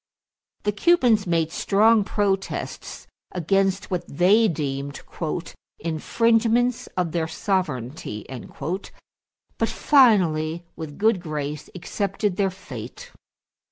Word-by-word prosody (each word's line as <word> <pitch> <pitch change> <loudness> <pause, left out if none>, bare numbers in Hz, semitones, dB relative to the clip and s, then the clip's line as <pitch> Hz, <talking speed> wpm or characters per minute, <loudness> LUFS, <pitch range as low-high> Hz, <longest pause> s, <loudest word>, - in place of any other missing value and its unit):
The 210 - +1
Cubans 225 - +3
made 165 -2 +1
strong 215 +4 +4
protests 195 -1 -2 0.3
against 195 +3 +1
what 180 -1 -1
they 200 +9 +4
deemed 140 -4 -3 0.8
"infringements 230 +8 +1
of 175 -3 0
their 160 0 -1
sovereignty"; 150 - -3 1.3
but - - +1
finally 175 - +3
with 155 -3 -7
good 215 -3 +2
grace 150 -3 -4
accepted 195 +1 -2
their 195 -1 +2
fate. 130 - -9
185 Hz, 90 wpm, -24 LUFS, 155-210 Hz, 1.3 s, strong